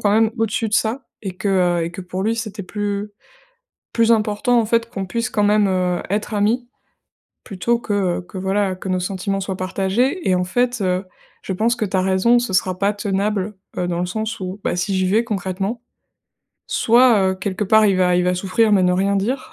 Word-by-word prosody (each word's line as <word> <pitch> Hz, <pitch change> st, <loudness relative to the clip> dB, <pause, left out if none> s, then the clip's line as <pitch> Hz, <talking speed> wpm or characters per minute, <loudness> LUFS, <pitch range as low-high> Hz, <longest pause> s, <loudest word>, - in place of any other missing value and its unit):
quand 205 Hz, -, +2 dB
même, 220 Hz, +1 st, +3 dB
au-dessus 225 Hz, 0 st, 0 dB
de -, -, -11 dB
ça 235 Hz, +5 st, 0 dB, 0.2 s
et 185 Hz, -3 st, -5 dB
que, 200 Hz, -, -2 dB
heu 175 Hz, -3 st, +2 dB
et 170 Hz, -, -4 dB
que 190 Hz, -, -7 dB
pour 185 Hz, +1 st, -5 dB
lui 225 Hz, +1 st, +1 dB
c'était 215 Hz, -2 st, -5 dB
plus, 205 Hz, +1 st, -3 dB, 0.8 s
plus 230 Hz, 0 st, +3 dB
important, 220 Hz, +2 st, +2 dB
en -, -, 0 dB
fait, 230 Hz, +1 st, +1 dB
qu'on 195 Hz, -3 st, -4 dB
puisse 235 Hz, +5 st, -2 dB
quand 210 Hz, -1 st, +1 dB
même, 210 Hz, 0 st, +4 dB
heu, 180 Hz, -1 st, 0 dB
être 210 Hz, +2 st, -2 dB
amis 230 Hz, +4 st, +1 dB, 0.8 s
plutôt 235 Hz, +4 st, -1 dB
que, 210 Hz, -, -3 dB
heu, 185 Hz, -3 st, 0 dB
que, 190 Hz, -, -9 dB
voilà, 190 Hz, 0 st, 0 dB
que 190 Hz, +1 st, -7 dB
nos 185 Hz, 0 st, +1 dB
sentiments 195 Hz, +2 st, -2 dB
soient 190 Hz, 0 st, -3 dB
partagés. 195 Hz, -, 0 dB
Et 185 Hz, -, +4 dB
en 180 Hz, -, +1 dB
fait, 245 Hz, +6 st, 0 dB
heu, 185 Hz, 0 st, 0 dB, 0.4 s
je 190 Hz, -, -3 dB
pense 225 Hz, +5 st, +1 dB
que 215 Hz, -, 0 dB
tu 190 Hz, -, -3 dB
as -, -, +3 dB
raison, 190 Hz, +6 st, +3 dB
ce 240 Hz, -4 st, -3 dB
sera 185 Hz, 0 st, +1 dB
pas 200 Hz, +1 st, +2 dB
tenable, 205 Hz, 0 st, -1 dB, 0.2 s
heu, 180 Hz, -, -1 dB
dans 175 Hz, -1 st, -2 dB
le 180 Hz, -, 0 dB
sens 220 Hz, +4 st, -3 dB
où, 185 Hz, +2 st, -5 dB
bah, -, -, 0 dB
si 180 Hz, +2 st, -1 dB
j'y 185 Hz, 0 st, +1 dB
vais 220 Hz, +5 st, +3 dB
concrètement 195 Hz, +2 st, -3 dB, 0.9 s
soit, 235 Hz, -2 st, +4 dB
heu, -, -, -3 dB
quelque 190 Hz, +1 st, -3 dB
part 220 Hz, +2 st, +5 dB
il 195 Hz, -2 st, +3 dB
va 180 Hz, -1 st, +3 dB
il 180 Hz, -, +2 dB
va 180 Hz, 0 st, +2 dB
souffrir 205 Hz, +4 st, +1 dB
mais 190 Hz, -2 st, +4 dB
ne 180 Hz, 0 st, +3 dB
rien 200 Hz, +2 st, +1 dB
dire, 250 Hz, +7 st, -2 dB
200 Hz, 220 wpm, -20 LUFS, 185-220 Hz, 0.9 s, part